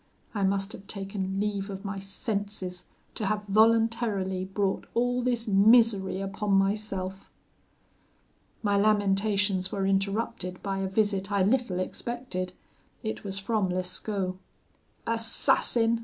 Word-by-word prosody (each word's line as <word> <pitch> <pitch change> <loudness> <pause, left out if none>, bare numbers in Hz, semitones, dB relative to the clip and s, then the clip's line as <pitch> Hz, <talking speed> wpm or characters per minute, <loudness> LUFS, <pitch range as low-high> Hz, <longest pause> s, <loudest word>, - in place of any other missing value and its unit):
I 205 - -2
must 195 +1 +1
have 200 - -11
taken 195 -1 -3
leave 205 -1 -1
of 195 +1 -7
my 195 0 -3
senses, 200 -3 -4 0.3
to 215 - -2
have 210 +1 0
voluntarily 215 -3 +2
brought 195 0 -1
all 245 +1 +1
this 240 -2 0
misery 205 -2 +4
upon 195 +1 -2
myself.' 195 -1 0 1.3
"My 205 -1 +2
lamentations 200 -2 +2
were 195 -1 -1
interrupted 195 -1 -1
by 195 -1 -2
a 195 - -1
visit 195 -1 0
I 200 -2 +3
little 225 -2 +1
expected; 190 -2 -4 0.5
it 220 -1 -4
was 195 -1 -4
from 200 -1 0
Lescaut. 185 +1 -2 0.7
'Assassin!' 230 0 +3
200 Hz, 120 wpm, -28 LUFS, 195-220 Hz, 1.3 s, misery